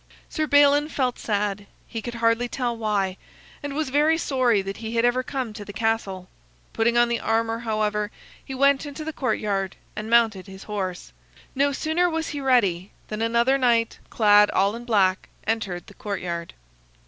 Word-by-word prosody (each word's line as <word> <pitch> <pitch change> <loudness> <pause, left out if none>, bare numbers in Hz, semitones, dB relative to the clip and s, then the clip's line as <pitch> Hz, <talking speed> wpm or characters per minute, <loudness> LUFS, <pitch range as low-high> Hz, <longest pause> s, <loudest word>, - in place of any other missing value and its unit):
Sir 310 0 -1
Balin 285 +1 +5
felt 255 -5 -1
sad, 205 -1 -2 0.2
he 225 - -5
could 240 +1 -6
hardly 230 +1 +2
tell 245 -2 -2
why; 205 -4 -1 0.4
and 285 -1 -5
was 310 -2 -1
very 300 +3 +3
sorry 250 -9 +1
that 195 +1 -5
he 225 0 -5
had 230 +1 +3
ever 245 +1 +2
come 255 -4 -4
to 210 - -8
the 205 - -9
castle. 205 -4 -2 0.5
Putting 235 +1 +2
on 240 0 +5
the 235 -1 -1
armor, 225 0 0
however, 215 -2 -1 0.3
he 265 - -7
went 280 +2 +3
into 290 +2 -7
the 315 - -4
courtyard 200 -8 -1 0.2
and 215 +1 -5
mounted 225 -5 +3
his 190 0 -11
horse. 185 - -5 0.4
No 280 +1 +2
sooner 320 +5 +1
was 325 -1 -2
he 290 -2 -4
ready 205 -9 +2 0.2
than 215 +1 -4
another 235 +4 +2
knight, 235 -3 +2
clad 210 -2 +5
all 200 +3 +1
in 240 +1 -8
black, 195 -5 +2 0.2
entered 205 -6 -2
the - - -14
courtyard. 180 -5 -5
230 Hz, 175 wpm, -24 LUFS, 205-260 Hz, 0.5 s, Balin